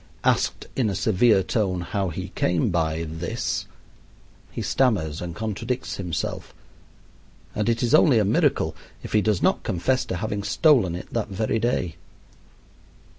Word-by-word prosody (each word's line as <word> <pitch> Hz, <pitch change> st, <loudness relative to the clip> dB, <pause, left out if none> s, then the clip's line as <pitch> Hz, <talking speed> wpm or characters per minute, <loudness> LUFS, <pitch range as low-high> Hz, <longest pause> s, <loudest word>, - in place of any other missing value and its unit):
Asked -, -, +1 dB
in 120 Hz, -5 st, +1 dB
a 100 Hz, -, -2 dB
severe 105 Hz, +1 st, +3 dB
tone 95 Hz, -3 st, -1 dB
how 95 Hz, +2 st, -2 dB
he 85 Hz, -, -5 dB
came 85 Hz, -2 st, 0 dB
by 80 Hz, -1 st, 0 dB
"this," 80 Hz, +1 st, -3 dB, 0.8 s
he -, -, -4 dB
stammers 95 Hz, -, +1 dB
and 85 Hz, -1 st, -5 dB
contradicts 110 Hz, +4 st, -3 dB
himself, 85 Hz, -4 st, -4 dB, 1.0 s
and 105 Hz, +2 st, 0 dB
it 115 Hz, +1 st, 0 dB
is 120 Hz, -, +1 dB
only 150 Hz, -5 st, +6 dB
a 105 Hz, -, +3 dB
miracle 100 Hz, -, +1 dB, 0.3 s
if -, -, -7 dB
he 105 Hz, -, +4 dB
does 105 Hz, -3 st, 0 dB
not -, -, +3 dB
confess 130 Hz, +9 st, 0 dB
to -, -, -3 dB
having 100 Hz, +2 st, -3 dB
stolen 100 Hz, -, +3 dB
it 90 Hz, -, -8 dB
that 115 Hz, -2 st, -1 dB
very 110 Hz, +3 st, -1 dB
day. 105 Hz, -7 st, -1 dB
100 Hz, 150 wpm, -24 LUFS, 85-115 Hz, 1.0 s, only